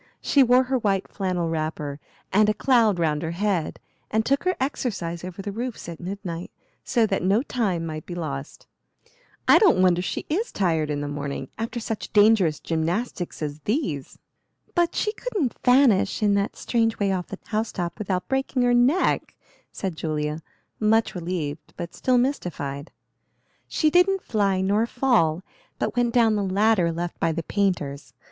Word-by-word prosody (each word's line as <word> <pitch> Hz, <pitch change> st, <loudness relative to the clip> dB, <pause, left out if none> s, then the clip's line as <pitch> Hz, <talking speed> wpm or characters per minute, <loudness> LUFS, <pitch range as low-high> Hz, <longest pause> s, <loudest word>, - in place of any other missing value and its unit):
She 280 Hz, -, +3 dB
wore 250 Hz, 0 st, +5 dB
her 260 Hz, 0 st, 0 dB
white 195 Hz, -4 st, 0 dB
flannel 180 Hz, -3 st, -2 dB
wrapper, 155 Hz, -3 st, -3 dB, 0.3 s
and 210 Hz, +2 st, +5 dB
a 215 Hz, -, +1 dB
cloud 230 Hz, -7 st, +3 dB
round 155 Hz, -3 st, 0 dB
her 160 Hz, -, -3 dB
head, 195 Hz, -5 st, -1 dB, 0.3 s
and 220 Hz, +1 st, +1 dB
took 275 Hz, +5 st, +1 dB
her 370 Hz, -, +2 dB
exercise 195 Hz, -, -3 dB
over 185 Hz, +2 st, -7 dB
the 205 Hz, -, -4 dB
roofs 235 Hz, 0 st, -5 dB
at 170 Hz, -2 st, -7 dB
midnight, 180 Hz, -2 st, -5 dB, 0.3 s
so 235 Hz, -4 st, +2 dB
that 195 Hz, -2 st, -1 dB
no 200 Hz, +7 st, +2 dB
time 195 Hz, -, -1 dB
might 155 Hz, -1 st, -6 dB
be 175 Hz, -, -5 dB
lost. 140 Hz, -5 st, -6 dB, 0.8 s
I -, -, +8 dB
don't 380 Hz, -, +5 dB
wonder 180 Hz, -1 st, +4 dB
she 175 Hz, -, -3 dB
is 400 Hz, +10 st, -1 dB
tired 160 Hz, -6 st, 0 dB
in 145 Hz, -1 st, -2 dB
the 145 Hz, -, -3 dB
morning, 140 Hz, -2 st, -4 dB
after 230 Hz, +2 st, -3 dB
such 225 Hz, -1 st, -5 dB
dangerous 205 Hz, -7 st, +4 dB
gymnastics 170 Hz, +2 st, -2 dB
as 150 Hz, 0 st, -4 dB
these." 185 Hz, -, -2 dB, 0.6 s
"But 345 Hz, -1 st, +1 dB
she 425 Hz, -, 0 dB
couldn't 415 Hz, -, -2 dB
vanish 245 Hz, -5 st, +4 dB
in 205 Hz, -1 st, +4 dB
that 200 Hz, +1 st, 0 dB
strange 225 Hz, -2 st, 0 dB
way 200 Hz, -1 st, +1 dB
off 180 Hz, -2 st, -2 dB
the 195 Hz, -, -7 dB
house 220 Hz, 0 st, -1 dB
top 175 Hz, +1 st, -4 dB
without 190 Hz, -3 st, -2 dB
breaking 265 Hz, -1 st, 0 dB
her 245 Hz, 0 st, +3 dB
neck," 250 Hz, +9 st, +2 dB, 0.4 s
said 190 Hz, -4 st, -4 dB
Julia, 155 Hz, -1 st, -2 dB, 0.4 s
much 220 Hz, +1 st, +2 dB
relieved, 165 Hz, -4 st, -4 dB
but 170 Hz, -1 st, -6 dB
still 255 Hz, -1 st, +1 dB
mystified. 170 Hz, -, -2 dB, 0.8 s
"She 310 Hz, -1 st, +1 dB
didn't 365 Hz, +3 st, +3 dB
fly 200 Hz, -4 st, +1 dB
nor 205 Hz, +4 st, +2 dB
fall, 225 Hz, -11 st, +2 dB, 0.3 s
but -, -, -2 dB
went 240 Hz, -1 st, +2 dB
down 230 Hz, -2 st, +4 dB
the 205 Hz, -, 0 dB
ladder 195 Hz, -2 st, +2 dB
left 170 Hz, +1 st, -4 dB
by 165 Hz, -, +1 dB
the 165 Hz, +1 st, -3 dB
painters. 165 Hz, -9 st, -2 dB
195 Hz, 170 wpm, -24 LUFS, 165-240 Hz, 0.8 s, I